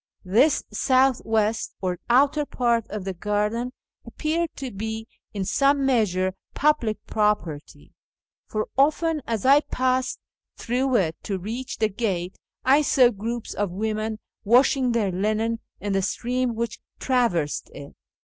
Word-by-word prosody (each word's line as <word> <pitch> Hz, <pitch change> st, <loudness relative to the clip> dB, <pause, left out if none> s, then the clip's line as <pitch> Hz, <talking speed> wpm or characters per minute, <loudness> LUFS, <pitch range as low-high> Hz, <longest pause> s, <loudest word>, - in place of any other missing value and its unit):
This 245 Hz, +11 st, +3 dB
south 260 Hz, +3 st, +3 dB
west 220 Hz, 0 st, 0 dB
or 180 Hz, -2 st, -2 dB
outer 280 Hz, +4 st, +4 dB
part 235 Hz, -5 st, 0 dB
of 205 Hz, -2 st, -5 dB
the 190 Hz, -, -3 dB
garden 210 Hz, +6 st, -1 dB, 0.3 s
appeared 330 Hz, +2 st, -2 dB
to 265 Hz, -2 st, -5 dB
be 220 Hz, +2 st, -5 dB, 0.2 s
in 195 Hz, -2 st, -3 dB
some 275 Hz, +5 st, +2 dB
measure 190 Hz, -8 st, +1 dB, 0.2 s
public 285 Hz, -8 st, +2 dB
j^ropertj, 210 Hz, -9 st, -2 dB, 0.6 s
for 215 Hz, 0 st, -2 dB
often, 305 Hz, +3 st, +2 dB
as 225 Hz, -2 st, -2 dB
I 275 Hz, +2 st, +7 dB
passed 255 Hz, -2 st, -1 dB, 0.4 s
through 255 Hz, +2 st, 0 dB
it 165 Hz, -7 st, +1 dB
to 200 Hz, -3 st, -3 dB
reach 230 Hz, +8 st, -5 dB
the 220 Hz, -, +2 dB
gate, 190 Hz, -4 st, -2 dB, 0.3 s
I 275 Hz, +3 st, +5 dB
saw 260 Hz, -4 st, +5 dB
groups 230 Hz, +2 st, -4 dB
of 205 Hz, -2 st, -1 dB
women 215 Hz, +3 st, -2 dB, 0.3 s
washing 250 Hz, +3 st, +4 dB
their 215 Hz, -5 st, +1 dB
linen 215 Hz, +4 st, 0 dB, 0.2 s
in 205 Hz, -1 st, -2 dB
the 195 Hz, -, +2 dB
stream 245 Hz, +4 st, -1 dB
which 230 Hz, +1 st, -3 dB, 0.2 s
traversed 230 Hz, -, 0 dB
it. 140 Hz, -, -11 dB
225 Hz, 140 wpm, -24 LUFS, 205-260 Hz, 0.6 s, I